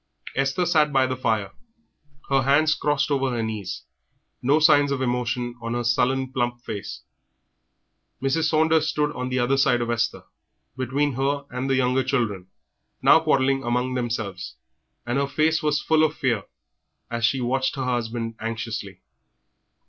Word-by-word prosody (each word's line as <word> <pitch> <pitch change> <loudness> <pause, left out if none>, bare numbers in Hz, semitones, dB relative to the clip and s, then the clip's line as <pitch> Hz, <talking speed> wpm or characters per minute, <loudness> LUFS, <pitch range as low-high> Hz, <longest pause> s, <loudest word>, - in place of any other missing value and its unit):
Esther 135 +6 +1
sat 155 -3 +3
by 135 -1 +3
the 130 0 -2
fire, 110 -6 -1 0.8
her 135 -1 +3
hands 145 +4 +3
crossed 145 0 0
over 135 -1 +1
her 120 -2 -2
knees, 110 -4 -5 0.6
no 140 +4 +3
signs 145 -2 +5
of 140 - -1
emotion 125 -1 -1
on 115 +1 -3
her 120 - -1
sullen, 130 +2 +1
plump 120 -1 -1
face. 105 -4 -6 1.2
Mrs. 135 +4 0
Saunders 160 0 +3
stood 150 -2 0
on 125 -3 -4
the 130 - -1
other 130 +2 +2
side 125 -2 +3
of 120 0 -1
Esther, 120 0 -1 0.5
between 135 +3 0
her 140 +2 -1
and 125 +2 -3
the 135 - +3
younger 130 0 +2
children, 115 -9 -1 0.6
now - - +7
quarrelling 135 0 +2
among 125 +1 -1
themselves, 115 -6 -4 0.5
and 120 +3 0
her 140 - 0
face 155 +3 +1
was 150 -1 +1
full 160 -1 +3
of 155 -1 +1
fear 115 -7 0 0.7
as 120 0 -3
she 130 +4 +2
watched 130 +3 0
her 135 -2 -3
husband 115 -2 -2
anxiously. 110 -4 -5
130 Hz, 155 wpm, -24 LUFS, 120-140 Hz, 1.2 s, now